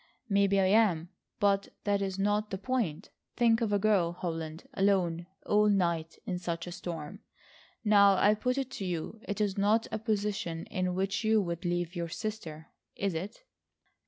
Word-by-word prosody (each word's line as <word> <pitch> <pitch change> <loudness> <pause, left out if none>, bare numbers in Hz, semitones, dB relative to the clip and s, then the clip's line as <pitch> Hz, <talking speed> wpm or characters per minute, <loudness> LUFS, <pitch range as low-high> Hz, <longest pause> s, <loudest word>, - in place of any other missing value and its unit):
"Maybe 200 -1 +3
I 190 - +4
am, 185 -5 +3 0.3
but 200 -1 +2 0.2
that 200 -1 +1
is 190 -1 -2
not 205 +2 +1
the 190 - -3
point. 205 -6 -2 0.2
Think 230 -1 +3
of 220 -3 0
a 205 - +3
girl, 195 -5 +2
Holland, 165 -2 -5
alone, 180 -4 +1 0.2
all 210 0 +4
night, 170 -5 0
in 180 -2 -2
such 170 -1 -3
a 175 - -7
storm. 170 0 -6 0.6
Now, 200 -2 +6
I 205 +2 +5
put 250 +5 -1
it 265 -1 -2
to 195 - -5
you: 180 +5 -4
it 205 - -3
is 205 -2 0
not 215 +3 +3
a 220 - -2
position 205 -6 -2
in 185 -1 -1
which 195 +3 -1
you 220 0 +4
would 170 0 -4
leave 175 0 -1
your 170 -1 -3
sister, 165 -6 -6 0.3
is 195 -2 -1
it?" 195 - -6
195 Hz, 175 wpm, -30 LUFS, 175-210 Hz, 0.6 s, Now